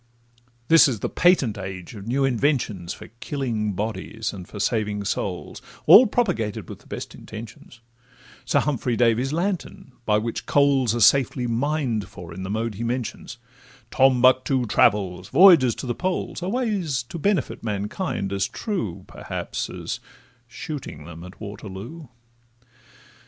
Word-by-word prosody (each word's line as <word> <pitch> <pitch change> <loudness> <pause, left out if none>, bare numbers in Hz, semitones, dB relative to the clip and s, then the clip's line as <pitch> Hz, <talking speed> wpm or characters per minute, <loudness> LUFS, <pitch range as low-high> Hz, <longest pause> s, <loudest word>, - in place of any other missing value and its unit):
This 165 +1 +7
is 115 -7 -3
the - - -1
patent 135 - +3
age 95 -1 -7
of 100 -1 -9
new 135 +3 +1
inventions 120 - 0
For - - -9
killing 115 -8 -2
bodies, 110 +2 -4
and 90 -3 -9
for 105 - -9
saving 105 -1 0
souls, - - -4 0.2
All 250 +4 +9
propagated 180 - -1
with - - -9
the - - -22
best - - -6
intentions; 115 +2 -11 0.6
Sir - - +2
Humphry 130 -4 -1
Davy's 120 +3 +2
lantern, 175 -4 -3 0.2
by 105 -1 +4
which 115 +2 -3
coals 135 -5 +3
Are - - -1
safely 125 +1 +4
mined 120 -2 -1
for 85 -2 -10
in 95 - -7
the 95 - -5
mode 110 +2 -2
he 110 +4 -5
mentions, 125 0 -4 0.5
Tombuctoo 130 0 +4
travels, 95 -3 +2
voyages 155 - +7
to - - -6
the 120 - -1
Poles, 185 +4 -3
Are 180 - -2
ways 195 - -1
to 165 +8 -8
benefit 190 - 0
mankind, 105 - -3
as 95 0 0
true, 185 - -4
Perhaps, - - -5
as - - -5 0.5
shooting 125 - -7
them 85 0 -10
at 90 +1 -12
Waterloo. 105 - -8
120 Hz, 145 wpm, -24 LUFS, 105-140 Hz, 0.6 s, All